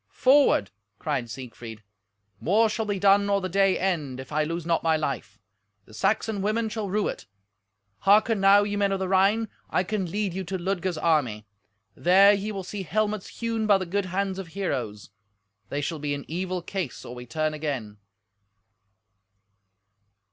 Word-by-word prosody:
"Forward!" 265 - +4 0.3
cried 135 -6 -2
Siegfried, 115 -3 -9 0.6
"More 215 +6 +3
shall 220 0 -2
be 205 -1 -1
done 200 +1 +4
or 200 0 +3
the 185 - -3
day 195 +1 +2
end, 155 -9 -2
if 130 - -9
I 155 +1 +1
lose 165 +1 -4
not 165 -1 +1
my 160 -1 +2
life. 140 -9 -4 0.5
The 110 - -17
Saxon 210 - 0
women 220 +3 0
shall 215 -2 -4
rue 210 +2 0
it. - - -6 0.7
Hearken 210 - +4
now, 195 +1 +6
ye 205 0 -2
men 200 -1 +1
of 195 - +1
the 190 0 -2
Rhine. 195 +4 +3 0.2
I 185 - +1
can 190 -2 -2
lead 200 0 -2
you 190 +1 -3
to 190 +3 -3
Ludger's 185 -1 -2
army. 145 -10 +1 0.5
There 195 +3 +6
ye 205 +1 -2
will 195 -2 -5
see 200 +2 -6
helmets 210 +3 -1
hewn 230 -2 -2
by 205 -2 +6
the 190 - -4
good 195 +3 -1
hands 190 +1 -2
of 190 - -6
heroes. 125 - -4 0.6
They 145 - -2
shall 155 +2 -3
be 145 -1 -2
in 140 - -8
evil 180 +1 -3
case 185 -10 -5
or 120 - -7
we 125 0 -9
turn 155 +4 -1
again." 135 -9 -4
185 Hz, 175 wpm, -26 LUFS, 155-205 Hz, 0.7 s, now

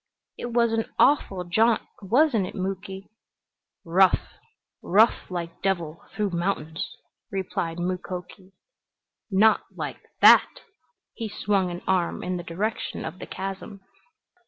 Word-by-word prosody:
"It - - -5
was 235 -1 +2
an 225 0 +1
awful 195 -10 +3
jaunt, 220 +6 +2 0.2
wasn't 230 -1 +3
it, - - -9
Muky?" 190 +1 -5 0.7
"Rough 185 +3 +3 0.5
rough 215 +5 +3
like 170 -2 -5
devil 170 -5 -1
th'ough 210 -2 0
mountains," 170 +3 -2 0.3
replied 180 -4 -3
Mukoki. 180 +1 -5 0.8
"Not 215 +2 +4
like - - -5 0.2
that!" - - +7 0.5
He 225 -2 -5
swung 200 -2 0
an 175 0 -6
arm 185 -2 0
in 180 0 -2
the 175 - -6
direction 200 +7 -3
of 185 - -7
the - - -7
chasm. 195 +1 -6
190 Hz, 120 wpm, -25 LUFS, 180-215 Hz, 0.8 s, that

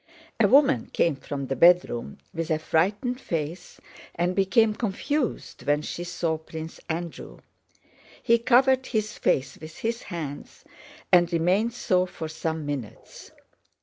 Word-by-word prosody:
A - - +5
woman 280 0 +4
came 165 -4 +2
from 140 0 -5
the 135 - -2
bedroom 170 - +3 0.2
with 165 0 -3
a 155 - +2
frightened 205 - 0
face 165 +2 -4 0.4
and 175 +2 0
became 210 +3 +3
confused 240 +6 -2
when 145 +1 +2
she 175 - -5
saw 170 -2 -2
Prince 160 0 -8
Andrew. 170 0 -5 0.9
He 235 -1 +4
covered 260 +2 +4
his 215 -2 -2
face 135 - 0
with 155 0 -10
his 230 +1 -2
hands 155 -6 -7 0.5
and 175 -1 +5
remained 185 +7 +2
so 185 -5 +1
for 160 -2 -6
some 160 0 -4
minutes. 140 -7 -7
175 Hz, 135 wpm, -26 LUFS, 160-220 Hz, 0.9 s, A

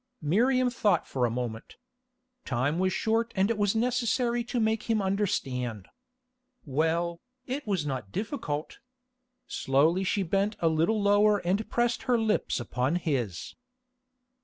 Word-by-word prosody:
Miriam 250 - +3
thought 215 -4 +1
for 125 -2 0
a - - -2
moment. 115 -1 -5 0.7
Time 140 +6 -1
was 185 0 +2
short 225 +4 0
and 195 +3 +2
it 230 - -1
was 205 +1 +2
necessary 240 0 +1
to 240 +1 -2
make 220 0 0
him 225 -1 +3
understand. 135 - -1 0.8
Well, 165 +4 0 0.2
it 265 0 -4
was 190 -7 0
not 130 -8 -4
difficult. 185 - -4 0.7
Slowly 170 - +2
she 195 +1 0
bent 200 +4 0
a 165 - +3
little 165 +8 +1
lower 205 +1 +4
and 200 +5 0
pressed 240 0 +1
her 245 - +5
lips 220 -9 0
upon 125 +5 -1
his. 130 - -2
195 Hz, 135 wpm, -28 LUFS, 145-225 Hz, 0.8 s, her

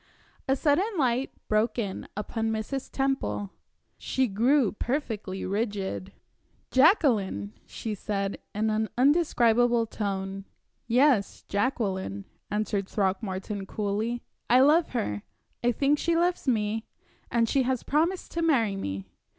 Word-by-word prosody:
A 270 - +3
sudden 355 - +1
light 260 -2 +1 0.2
broke 215 +2 +1
in 200 -5 -3
upon 225 +1 -2
Mrs. 220 +5 -3
Temple. 270 -7 -1 0.5
She 260 - +1
grew 235 +3 +3
perfectly 215 -6 -3
rigid. 195 - -2 0.6
"Jacqueline!" 235 - +3
she 220 - -5
said, 200 -1 -3 0.2
in 215 +1 +1
an 220 0 0
undescribable 245 -5 +4
tone. 195 -2 -4 0.4
"Yes, 245 -3 +3
Jacqueline," 195 - -1 0.2
answered 205 -2 -1
Throckmorton, 195 0 -2
coolly. 215 +4 -2 0.3
"I 250 +2 +6
love 310 +5 +5
her 105 - -1 0.4
I 245 - +4
think 285 +4 +2
she 335 0 +1
loves 350 -2 +1
me 220 -2 +1 0.5
and 230 -1 +2
she 270 - +2
has 255 -1 0
promised 335 +6 0
to 335 - -2
marry 240 -11 +2
me. 95 - -4
225 Hz, 120 wpm, -27 LUFS, 200-270 Hz, 0.6 s, I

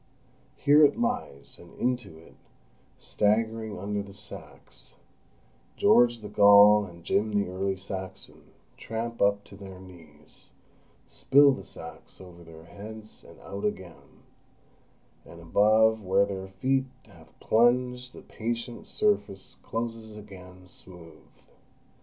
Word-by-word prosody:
Here 145 +2 +5
it 145 +10 +3
lies, 240 - -4
and 85 - -16
into 120 -9 -2
it, 80 - -17 0.6
staggering 110 0 -1
under 100 +2 -3
the 100 -1 -11
sacks, 105 0 -10 0.8
George 120 -1 +4
the 105 - -7
Gaul 105 +1 +6
and 85 -2 -14
Jim 105 +5 0
the 100 -2 0
Early 95 +1 -3
Saxon 95 0 -8 0.3
tramp 115 +1 -5
up 100 0 +2
to 100 - -15
their 95 -2 -11
knees, 80 -5 -14 0.6
spill 140 +1 +4
the 130 - -5
sacks - - -10
over 90 -2 -13
their 80 -1 -14
heads, 105 +3 -11
and - - -16
out 100 +1 -8
again; 95 -5 -6 1.0
and 85 - -14
above 110 +6 +3
where 100 +1 +2
their 95 -1 -6
feet 130 +8 -1 0.2
have 85 -6 -20
plunged 125 +2 +1
the - - -13
patient 115 +1 -5
surface 200 - -2
closes 115 -1 -6
again, 95 -3 -13
smooth. 85 -4 -14
100 Hz, 125 wpm, -27 LUFS, 95-115 Hz, 1.0 s, Gaul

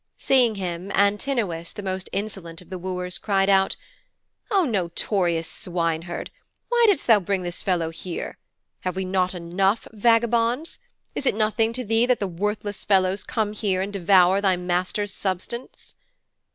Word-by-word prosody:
Seeing 250 -5 +3
him, 180 0 -4
Antinous, 200 -4 +1
the 205 - -8
most 190 -1 -3
insolent 195 -5 -4
of 180 0 -16
the 185 - -4
wooers, 180 0 -3
cried 195 -2 +1
out, 195 -1 +4 0.7
'O 390 -4 +3
notorious 175 - 0
swineherd, 170 -2 -3 0.4
why 480 0 +3
didst 400 -9 +3
thou 225 -3 +6
bring 190 0 -1
this 175 0 -4
fellow 170 -4 0
here? 170 +1 -6 0.4
Have 185 -1 -3
we 190 0 -2
not 185 0 0
enough 190 +5 0
vagabonds? 235 +5 +2 0.3
Is 275 - -2
it - - +3
nothing 220 +1 +1
to 250 +1 -3
thee 225 +3 +2
that 250 -1 +2
worthless 205 +3 -3
fellows 190 -1 +2
come 215 -2 -1
here 200 -3 0
and 195 +2 -3
devour 190 0 +4
thy 190 -2 +3
master's 180 +3 -1
substance?' 195 +7 -5
195 Hz, 150 wpm, -24 LUFS, 180-215 Hz, 0.7 s, thou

